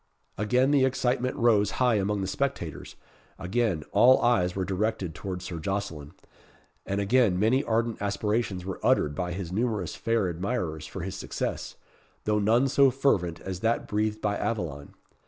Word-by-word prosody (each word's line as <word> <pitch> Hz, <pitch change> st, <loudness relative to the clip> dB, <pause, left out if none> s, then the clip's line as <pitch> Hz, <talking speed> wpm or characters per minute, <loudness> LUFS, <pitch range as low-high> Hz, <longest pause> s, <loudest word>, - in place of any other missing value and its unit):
Again 125 Hz, +6 st, +2 dB
the 140 Hz, -2 st, +4 dB
excitement 130 Hz, -1 st, 0 dB
rose 110 Hz, -4 st, +3 dB
high 125 Hz, -2 st, +3 dB
among 100 Hz, 0 st, 0 dB
the 95 Hz, -, -2 dB
spectators; 95 Hz, -, -3 dB, 0.4 s
again 95 Hz, -4 st, -1 dB
all 130 Hz, +2 st, +6 dB
eyes 90 Hz, -7 st, +2 dB
were 95 Hz, -1 st, -1 dB
directed 95 Hz, -2 st, -2 dB
towards 90 Hz, 0 st, -6 dB
Sir 85 Hz, -2 st, -5 dB
Jocelyn; 80 Hz, -5 st, -4 dB, 0.7 s
and 100 Hz, +1 st, -1 dB
again 100 Hz, -2 st, +3 dB
many 115 Hz, +8 st, +2 dB
ardent 115 Hz, -1 st, -1 dB
aspirations 100 Hz, -1 st, -1 dB
were 95 Hz, -, -5 dB
uttered 75 Hz, -, +2 dB
by 90 Hz, +2 st, -3 dB
his 90 Hz, -1 st, -5 dB
numerous 105 Hz, -5 st, -1 dB
fair 110 Hz, +3 st, 0 dB
admirers 85 Hz, -, -3 dB
for 95 Hz, -, -7 dB
his 95 Hz, +2 st, -4 dB
success, -, -, -4 dB, 0.5 s
though 105 Hz, 0 st, +1 dB
none 115 Hz, +6 st, +3 dB
so 140 Hz, 0 st, +5 dB
fervent 110 Hz, -11 st, 0 dB
as 95 Hz, -2 st, -5 dB
that 115 Hz, +3 st, 0 dB
breathed 105 Hz, +1 st, -1 dB
by 100 Hz, -1 st, 0 dB
Aveline. 80 Hz, -11 st, -4 dB
100 Hz, 155 wpm, -27 LUFS, 90-120 Hz, 0.7 s, all